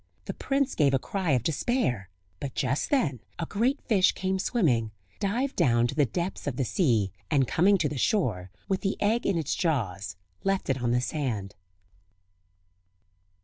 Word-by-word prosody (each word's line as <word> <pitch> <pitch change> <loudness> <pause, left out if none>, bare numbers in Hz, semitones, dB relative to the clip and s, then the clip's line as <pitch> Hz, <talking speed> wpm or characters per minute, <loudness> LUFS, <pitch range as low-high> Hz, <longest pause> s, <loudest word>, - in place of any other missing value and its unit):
The - - -4
prince 275 -1 0
gave 140 -3 +3
a - - +5
cry 185 +6 -3
of 125 -3 +2
despair; 145 - 0 0.3
but 140 -2 -5
just 135 +2 0
then 155 - +1 0.2
a 170 - -2
great 240 - 0
fish 195 -6 +3
came 190 0 -1
swimming, 145 - +1 0.3
dived 240 +7 -1
down 120 -8 +3
to 120 - -2
the 145 -2 +2
depths 175 +3 -3
of 140 - -1
the 130 - 0
sea, 115 - +1 0.2
and 140 -5 +3
coming 190 - +4
to 160 -4 +1
the 145 -2 -4
shore, 110 - 0 0.2
with 190 -1 0
the 195 - -1
egg 220 +3 +1
in 195 - +2
its 155 -4 -1
jaws, 100 - -1 0.3
left 195 -7 +1
it 130 -1 -2
on 120 - 0
the 125 +1 +2
sand. 120 -9 -3
150 Hz, 175 wpm, -27 LUFS, 120-195 Hz, 0.3 s, a